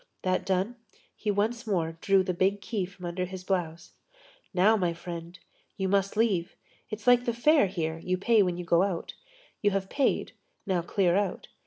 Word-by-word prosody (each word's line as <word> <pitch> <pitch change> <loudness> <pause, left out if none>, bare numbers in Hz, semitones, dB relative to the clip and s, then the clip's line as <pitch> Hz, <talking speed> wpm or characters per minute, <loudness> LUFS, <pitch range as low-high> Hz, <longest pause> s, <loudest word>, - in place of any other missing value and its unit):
That 185 0 0
done, 195 +6 0 0.4
he 215 - -4
once 220 +4 0
more 165 -5 -1
drew 195 -1 +4
the 185 -1 -1
big 190 +3 +1
key 200 0 -2
from 180 0 -11
under 180 +1 -2
his 185 0 -8
blouse. 175 -3 -2 0.6
"Now, 195 +4 +4
my 180 -5 0
friend, 170 +1 -7 0.4
you 190 - -1
must 195 +1 +1
leave. 200 -7 +1 0.3
It's 215 0 -7
like 245 0 +5
the 235 - 0
fair 290 -1 +4
here, 165 -3 -3
you 185 +2 -1
pay 220 +3 +4
when 180 -3 0
you 180 - -5
go 170 +1 +4
out. 190 -3 -2 0.5
You 205 - +4
have 195 -1 -2
paid, 280 -2 +1 0.3
now 185 -3 +1
clear 175 0 +1
out." 200 -2 -1
190 Hz, 185 wpm, -28 LUFS, 175-205 Hz, 0.6 s, like